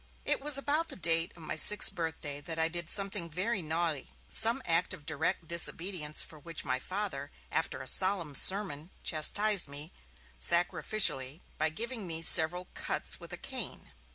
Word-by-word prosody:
It -, -, +1 dB
was 290 Hz, 0 st, +4 dB
about 295 Hz, +4 st, -1 dB
the 295 Hz, -, -7 dB
date 165 Hz, -1 st, +1 dB
of 170 Hz, -, -14 dB
my 155 Hz, -, -5 dB
sixth 195 Hz, +5 st, +4 dB
birthday 160 Hz, -5 st, -5 dB
that 165 Hz, +1 st, -5 dB
I 160 Hz, 0 st, +1 dB
did 170 Hz, -1 st, -3 dB
something 195 Hz, -3 st, -1 dB
very 190 Hz, +6 st, -2 dB
naughty, 160 Hz, -3 st, -2 dB, 0.2 s
some 230 Hz, +4 st, +3 dB
act 165 Hz, +2 st, +1 dB
of 150 Hz, -5 st, -19 dB
direct 160 Hz, +2 st, -2 dB
disobedience, 170 Hz, -1 st, 0 dB
for 155 Hz, -, -14 dB
which 165 Hz, +1 st, -4 dB
my 130 Hz, 0 st, -1 dB
Father, 185 Hz, -4 st, -4 dB, 0.2 s
after 160 Hz, -4 st, -2 dB
a -, -, -10 dB
solemn 185 Hz, -1 st, +1 dB
sermon, 180 Hz, -1 st, +3 dB
chastised 200 Hz, +5 st, +1 dB
me, 145 Hz, +4 st, -5 dB, 0.5 s
sacrificially, 170 Hz, -, +3 dB, 0.2 s
by 155 Hz, +1 st, +1 dB
giving 225 Hz, +4 st, -4 dB
me 165 Hz, -1 st, -2 dB
several 170 Hz, +3 st, +6 dB
cuts -, -, -2 dB
with -, -, -12 dB
a -, -, -5 dB
cane. -, -, -6 dB
170 Hz, 165 wpm, -30 LUFS, 155-195 Hz, 0.5 s, several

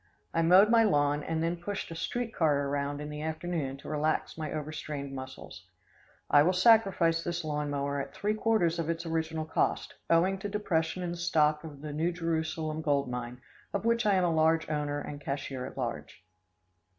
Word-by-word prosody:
I 165 Hz, -, +2 dB
mowed 185 Hz, +6 st, +6 dB
my 230 Hz, -1 st, +6 dB
lawn, 145 Hz, -7 st, +2 dB
and 160 Hz, +2 st, -2 dB
then 170 Hz, +1 st, 0 dB
pushed 195 Hz, +1 st, -5 dB
a -, -, -5 dB
street 235 Hz, +7 st, -3 dB
car 145 Hz, -6 st, +2 dB
around 145 Hz, 0 st, -2 dB
in 150 Hz, -, -5 dB
the 150 Hz, 0 st, -6 dB
afternoon 160 Hz, -3 st, -3 dB
to 140 Hz, -, -12 dB
relax 155 Hz, +1 st, -1 dB
my 155 Hz, -2 st, -4 dB
over 155 Hz, 0 st, -4 dB
strained 145 Hz, -3 st, -5 dB
muscles. 130 Hz, 0 st, -9 dB, 0.6 s
I 145 Hz, -, +6 dB
will 175 Hz, +5 st, +3 dB
sacrifice 185 Hz, -5 st, +4 dB
this 170 Hz, 0 st, -3 dB
lawn 150 Hz, -1 st, -2 dB
mower 140 Hz, 0 st, -1 dB
at -, -, -7 dB
three 210 Hz, +1 st, 0 dB
quarters 215 Hz, -6 st, +1 dB
of 165 Hz, -1 st, -2 dB
its 165 Hz, +1 st, -2 dB
original 160 Hz, -1 st, -2 dB
cost, -, -, 0 dB, 0.2 s
owing 185 Hz, +4 st, +3 dB
to 205 Hz, -, -4 dB
depression 180 Hz, -4 st, -1 dB
in 175 Hz, -, -2 dB
the 175 Hz, -, -5 dB
stock 155 Hz, -3 st, +2 dB
of 145 Hz, -3 st, -9 dB
the 150 Hz, -1 st, -6 dB
New 160 Hz, +4 st, 0 dB
Jerusalem 160 Hz, -2 st, -2 dB
gold 140 Hz, -4 st, 0 dB
mine, 125 Hz, 0 st, -5 dB, 0.3 s
of 200 Hz, +2 st, -2 dB
which 230 Hz, -1 st, +2 dB
I 200 Hz, -, +4 dB
am 185 Hz, -, +3 dB
a 170 Hz, -2 st, +2 dB
large 160 Hz, +1 st, +3 dB
owner 145 Hz, -1 st, -1 dB
and 145 Hz, 0 st, -7 dB
cashier 135 Hz, -2 st, -4 dB
at -, -, -11 dB
large. 120 Hz, -5 st, -5 dB
160 Hz, 200 wpm, -30 LUFS, 145-175 Hz, 0.6 s, mowed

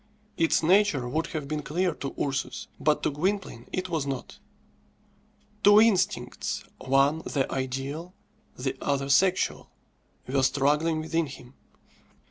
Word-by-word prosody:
Its 165 Hz, 0 st, +2 dB
nature 180 Hz, -7 st, +3 dB
would 155 Hz, +6 st, -1 dB
have 155 Hz, -5 st, -5 dB
been 155 Hz, +1 st, -2 dB
clear 175 Hz, +4 st, 0 dB
to 140 Hz, -, -6 dB
Ursus; 135 Hz, -1 st, -2 dB
but 150 Hz, -1 st, +1 dB
to -, -, +1 dB
Gwynplaine 180 Hz, -, -2 dB
it 185 Hz, 0 st, -2 dB
was 160 Hz, -5 st, -2 dB
not. 135 Hz, -2 st, -5 dB, 1.2 s
Two 205 Hz, +1 st, +8 dB
instincts 215 Hz, -5 st, +1 dB, 0.2 s
one 135 Hz, +4 st, +3 dB
the 140 Hz, -4 st, -1 dB
ideal, 135 Hz, +7 st, -4 dB, 0.4 s
the 130 Hz, +1 st, -2 dB
other 140 Hz, -1 st, -1 dB
sexual 185 Hz, +6 st, +2 dB, 0.6 s
were 135 Hz, +1 st, 0 dB
struggling 150 Hz, +4 st, +2 dB
within 160 Hz, 0 st, -1 dB
him. 130 Hz, -2 st, -12 dB
150 Hz, 125 wpm, -27 LUFS, 135-175 Hz, 1.2 s, Two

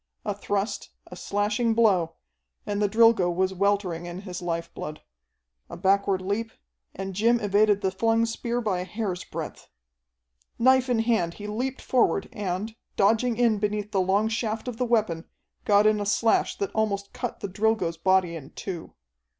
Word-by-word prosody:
A -, -, 0 dB
thrust, 205 Hz, +1 st, -2 dB, 0.2 s
a -, -, -11 dB
slashing 210 Hz, +3 st, 0 dB
blow, 190 Hz, -8 st, +3 dB, 0.5 s
and 205 Hz, 0 st, -2 dB
the 205 Hz, -, +2 dB
Drilgo 225 Hz, -4 st, +5 dB
was 185 Hz, +2 st, 0 dB
weltering 190 Hz, -3 st, 0 dB
in 175 Hz, +2 st, -6 dB
his 180 Hz, -3 st, -7 dB
life 170 Hz, -1 st, -3 dB
blood. 150 Hz, 0 st, -7 dB, 0.7 s
A 170 Hz, -, -8 dB
backward 195 Hz, 0 st, +2 dB
leap, 210 Hz, +4 st, -2 dB, 0.4 s
and 195 Hz, 0 st, -5 dB
Jim 230 Hz, +5 st, +3 dB
evaded 205 Hz, -1 st, +3 dB
the 190 Hz, -2 st, 0 dB
flung 225 Hz, +4 st, +2 dB
spear 235 Hz, +1 st, -2 dB
by 200 Hz, -5 st, 0 dB
a -, -, -2 dB
hair's 190 Hz, -1 st, -4 dB
breadth. -, -, -7 dB, 0.9 s
Knife 260 Hz, +1 st, +4 dB
in 240 Hz, -2 st, +2 dB
hand 220 Hz, -8 st, +1 dB
he 210 Hz, -, -8 dB
leaped 250 Hz, +6 st, -3 dB
forward, 200 Hz, -6 st, +2 dB
and, 210 Hz, 0 st, -3 dB, 0.2 s
dodging 225 Hz, +3 st, +2 dB
in 230 Hz, -4 st, +3 dB
beneath 210 Hz, 0 st, -2 dB
the 195 Hz, -, +2 dB
long 195 Hz, +4 st, +2 dB
shaft 225 Hz, 0 st, -2 dB
of 245 Hz, -3 st, -4 dB
the 250 Hz, -, 0 dB
weapon, 215 Hz, -9 st, +1 dB, 0.4 s
got 205 Hz, 0 st, +5 dB
in 215 Hz, -1 st, +3 dB
a -, -, -2 dB
slash 220 Hz, +2 st, +2 dB
that 200 Hz, -, -2 dB
almost 200 Hz, -2 st, -1 dB
cut -, -, -5 dB
the -, -, -2 dB
Drilgo's 195 Hz, -4 st, 0 dB
body 185 Hz, -1 st, +2 dB
in 145 Hz, -4 st, -9 dB
two. 180 Hz, -4 st, -6 dB
205 Hz, 170 wpm, -26 LUFS, 185-225 Hz, 0.9 s, Drilgo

